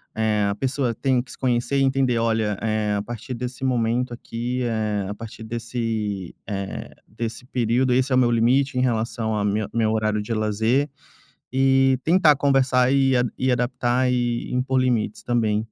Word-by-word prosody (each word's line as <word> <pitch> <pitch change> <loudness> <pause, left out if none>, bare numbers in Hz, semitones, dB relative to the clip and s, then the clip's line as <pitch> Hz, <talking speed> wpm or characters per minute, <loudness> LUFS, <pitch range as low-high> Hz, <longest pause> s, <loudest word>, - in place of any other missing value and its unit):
eh, 110 -2 +1
a - - 0
pessoa 130 -1 -1
tem 130 -1 +1
que - - -14
se - - -11
conhecer 125 +1 0
e - - +3
entender: 130 -3 +2
“Olha, 110 -2 +1
eh, 110 -1 0
a - - -1
partir 120 +3 -7
desse 125 +2 -6
momento 120 0 0
aqui, 120 +2 -4
eh, 105 -4 -1
a 105 - -4
partir 115 +1 -9
desse, 110 -4 -3
eh, 100 -2 -5 0.2
desse 115 +2 -6
período, 125 +1 +1
esse 130 +2 +1
é - - +4
o - - +4
meu 120 -1 +4
limite 125 +3 +2
em - - +2
relação 115 -2 -1
a 105 - 0
mi 105 +1 0
meu 110 -2 +1
horário 110 -1 0
de 115 +2 -4
lazer.” 110 +6 +1 0.6
E 135 0 +3
tentar 165 -3 +5
conversar, 130 -2 +3
e 135 -1 +3 0.2
e 130 0 +1
adaptar 125 +1 +1
e 120 -1 -1
impor 130 +1 +1
limites 115 -5 0
também. 115 -3 +1
120 Hz, 175 wpm, -23 LUFS, 110-130 Hz, 0.6 s, tentar